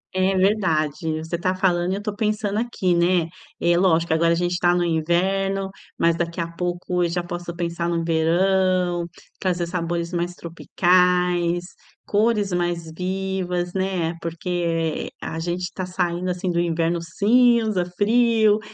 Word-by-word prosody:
É, 190 0 +2
verdade, 165 -6 +1
você 160 +2 -4
tá 185 +1 0
falando 180 -1 +1
e - - 0
eu 205 - -5
tô 210 -1 -3
pensando 210 -1 -1
aqui, 200 -7 0
né. 170 -1 +2 0.3
É, 170 0 +3
lógico 170 -2 +2
agora 165 +1 +3
a - - +2
gente 175 +1 0
tá 175 0 +3
no 175 - +1
inverno, 190 +4 0 0.3
mas 170 0 +3
daqui 170 0 -3
a 170 - -1
pouco 175 +1 -2
eu 170 - +1
já 175 +1 -2
posso 175 0 -5
pensar 170 0 -2
no 170 -1 -1
verão, 175 +1 +1 0.3
trazer 180 -2 0
sabores 170 0 -3
mais 175 +1 -2
tropicais, 175 0 +1 0.4
cores 210 -2 +1
mais 175 -2 -2
vivas, 180 -1 -2
né. 185 -3 -1
Porque, 165 -1 -2
eh, - - -13
a 160 - -4
gente 175 +1 -3
tá 185 - -4
saindo, 180 0 -1
assim, 180 0 -2
do 170 - 0
inverno 170 0 0
cinza, 220 +2 +3
frio 220 -1 +3
175 Hz, 155 wpm, -22 LUFS, 170-190 Hz, 0.4 s, É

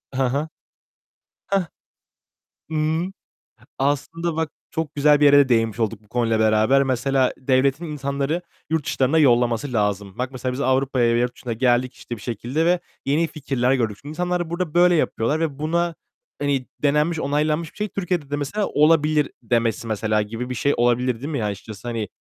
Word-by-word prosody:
Hı 135 - +1
hı. 140 +5 -1 1.0
Heh. 195 -3 0 1.0
Imm. 160 +4 0 0.7
Aslında 155 +4 -1
bak 160 -1 -1 0.2
çok 160 -2 -3
güzel 145 0 +4
bir 145 - +5
yere 145 0 +7
de 140 -2 +5
değinmiş 115 -1 +1
olduk 110 -1 -2
bu - - -25
konuyla 115 -2 0
beraber. 110 +5 +4
Mesela, 130 0 +1
devletin 135 +4 +1
insanları 140 +2 -2 0.3
yurt 160 -2 0
dışlarına 135 +5 +1
yollaması 120 -2 +3
lazım. 105 -2 -1
Bak 125 +1 -2
mesela 130 -1 -3
biz 135 - -3
Avrupa'ya 130 -3 +2
ve - - +2
yurt 125 0 -1
dışına 120 -3 -5
geldik 125 +1 +1
işte 120 - -7
bir 105 - -13
şekilde 120 +8 -2
ve 175 0 +3 0.3
yeni 155 +4 +2
fikirler 135 -4 0
gördük. 115 -5 0
Şimdi 145 - -9
insanlar 175 +1 -2
burada 170 -2 -3
böyle 175 0 +5
yapıyorlar 150 -1 0
ve 150 -4 -2
buna 170 +2 0 0.5
hani 140 -3 0 0.2
denenmiş, 150 +3 +2
onaylanmış 150 +2 0
bir - - -21
şey, 210 0 -1
Türkiye'de 180 -7 -3
de - - +1
mesela 150 +9 -2
olabilir 150 -1 +3
demesi 115 -1 0
mesela 110 0 0
gibi 115 +4 -5
bir 125 - -3
şey 140 +4 +1
olabilir 120 +1 +2
değil 135 +6 -7
mi? 120 -7 -2
Açıkçası 105 +2 -6
hani 115 -4 -2
135 Hz, 175 wpm, -22 LUFS, 120-155 Hz, 1.0 s, yere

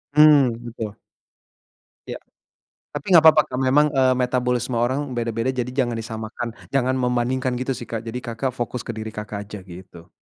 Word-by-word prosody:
Mmm, 150 -4 +7
betul. 110 -3 -6 1.1
Ya. - - -6 0.7
Tapi 145 +6 -3
enggak 165 -2 +8
papa, 155 -1 +6
Kak, 130 +1 -5
memang, 140 +3 +4
eee, 130 -2 +3
metabolisme 125 -1 0
orang 130 +3 0
beda-beda. 115 +1 -1
Jadi 125 -1 -3
jangan 120 -3 0
disamakan. 110 +1 -5 0.2
Jangan 130 -1 +1
membandingkan 125 +1 0
gitu 135 +1 -1
sih, 120 - -7
Kak. 115 - -3
Jadi, 115 +2 -4
Kakak, 120 +2 -3
fokus 120 0 -3
ke 115 - -5
diri 110 0 -5
Kakak, 105 -1 -6
aja 100 0 -9
gitu. 90 -2 -13
125 Hz, 165 wpm, -22 LUFS, 115-130 Hz, 1.1 s, enggak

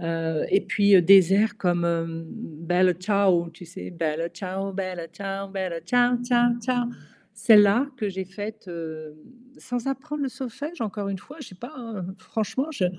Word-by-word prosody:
Heu, 165 -2 -1
et 195 - +5
puis, 205 -1 +3
heu, 180 - +6
des 190 0 +7
airs 210 +1 +2
comme, 175 -3 +1
hem, 165 -1 -1
Bella 180 -3 0
Ciao, 185 -2 +2
tu 170 +2 -13
sais? 170 - -8
Bella 165 -1 -2
ciao, 190 +2 -4
Bella 185 -3 -4
ciao, 195 +3 -5
Bella 185 -4 -3
ciao 245 +7 +3
ciao 240 -1 +4
ciao, 245 0 0 0.5
celle-là 220 +3 +6
que 215 -4 -2
j'ai 190 -1 -4
faite, 205 +2 -8
hem, 160 -3 -7 0.4
sans 245 0 -4
apprendre 295 +2 -3
le - - -1
solfège, 275 +7 -7
encore 205 -2 -3
une 195 -1 -3
fois, 290 - -13
je 280 - -8
sais - - -13
pas, 245 +9 -9
hein, 225 -7 -6
franchement 245 +6 -2
je 195 -11 -1
195 Hz, 175 wpm, -25 LUFS, 175-230 Hz, 0.5 s, des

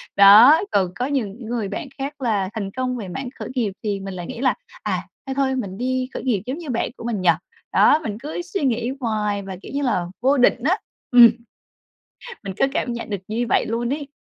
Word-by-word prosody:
Đó, 215 - +9
còn 185 -3 +2
có 250 - -1
những 245 -5 -3
người 230 -3 -2
bạn 310 - -5
khác 280 +1 -5
là 205 -6 0
thành 200 -4 -4
công 255 +2 -2
về 210 -5 -6
mảng 250 +8 -5
khởi - - -5
nghiệp 230 -6 0
thì 205 -2 -1
mình 195 0 -6
lại 175 -2 -6
nghĩ - - -7
là 265 - +3 0.3
"À, - - -1 0.3
thôi 265 - -3
thôi 270 -1 +1
mình 200 -7 -4
đi 255 +2 -1
khởi - - -5
nghiệp 230 -7 +1
giống 260 +4 -3
như 335 -4 -8
bạn 235 -2 -1
của - - -9
mình 230 -4 -2
nhỉ?" 180 - +3 0.4
Đó, 300 - +5
mình 210 -5 -4
cứ 300 +6 -5
suy 355 -1 -4
nghĩ 240 -1 0
hoài 210 -4 -1
và, 190 -1 -6
kiểu - - -10
như 285 - 0
là, 210 -9 +1 0.2
vô 270 +3 +3
định 245 -1 +3
á, 350 +8 +3 0.3
ừm, 240 -2 +9 1.2
mình 195 -1 -5
cứ - - +3
cảm 245 - -1
nhận 235 -1 -6
được 200 - -1
như 230 +3 -1
vậy - - +2
luôn 235 +2 -1
ấy. 285 -1 -4
240 Hz, 230 wpm, -22 LUFS, 205-265 Hz, 1.2 s, Đó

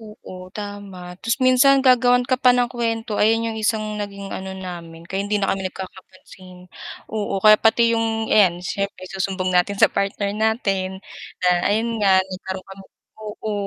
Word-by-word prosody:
Oo 185 -4 -11
tama, 200 -3 -8
'tas 230 0 -1
minsan 265 +2 +5
gagawan 245 -1 +4
ka 255 0 -1
pa 255 - +5
ng 245 - +3
kuwento, 225 -3 -2
ayan 225 +2 +3
'yong 220 - -6
isang 215 -1 -1
naging 200 -1 -7
ano 190 0 -6
namin, 170 -3 -9
kaya 190 +3 -4
hindi 205 +1 -1
na 200 -1 0
kami 190 -1 -3
nagkakapansin 185 -1 -12 0.5
oo 205 -2 -2
kaya 215 0 +7
pati 230 +1 +3
'yong 225 -1 -1
ayan 185 -5 +4
siyempre 200 0 -4
isusumbog 185 0 -3
natin 180 +3 +2
sa - - +4
partner 200 0 -1
natin, 200 -3 -1 0.5
na - - +4 0.2
ayun 225 +2 -1
nga 190 -2 +4
nagkaroon 190 0 -7
kami 195 0 -12 0.4
oo, 215 0 -6
205 Hz, 165 wpm, -21 LUFS, 190-225 Hz, 0.5 s, kaya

